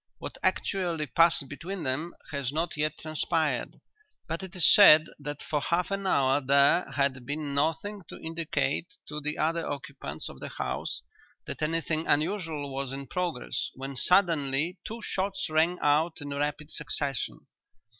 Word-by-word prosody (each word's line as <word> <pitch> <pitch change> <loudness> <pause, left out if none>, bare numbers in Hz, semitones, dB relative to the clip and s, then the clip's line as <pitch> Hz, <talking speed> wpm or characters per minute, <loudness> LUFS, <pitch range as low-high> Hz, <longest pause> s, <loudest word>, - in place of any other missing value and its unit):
What - - -7
actually 175 -5 0
passed 165 +1 +3
between 170 +6 -6
them 150 +7 -1 0.2
has 140 -3 -2
not 165 +3 -1
yet 150 0 -1
transpired, 155 -3 -1 0.5
but 165 +2 -3
it 190 0 -8
is 175 -3 +8
said 155 -7 +9
that 145 0 -6
for 150 -2 -1
half 175 +5 0
an 195 0 -2
hour 135 -4 +3
there 140 +5 +4
had 140 -2 0
been 145 +2 -4
nothing 165 +8 -1
to - - -9
indicate 165 +1 -1
to 150 0 -4
the 150 +1 -2
other 165 +2 0
occupants 140 - -5
of - - -10
the - - -6
house - - -3 0.4
that - - -6
anything 160 0 0
unusual 155 -3 0
was 135 -1 -2
in 135 0 -5
progress 175 -6 -2
when 135 +1 -6
suddenly 165 0 +2
two 230 +1 -6
shots 195 0 -2
rang 165 +3 +3
out 155 +3 +2
in 145 -1 -6
rapid 145 +1 -2
succession. 140 -3 -2
155 Hz, 155 wpm, -28 LUFS, 140-170 Hz, 0.5 s, said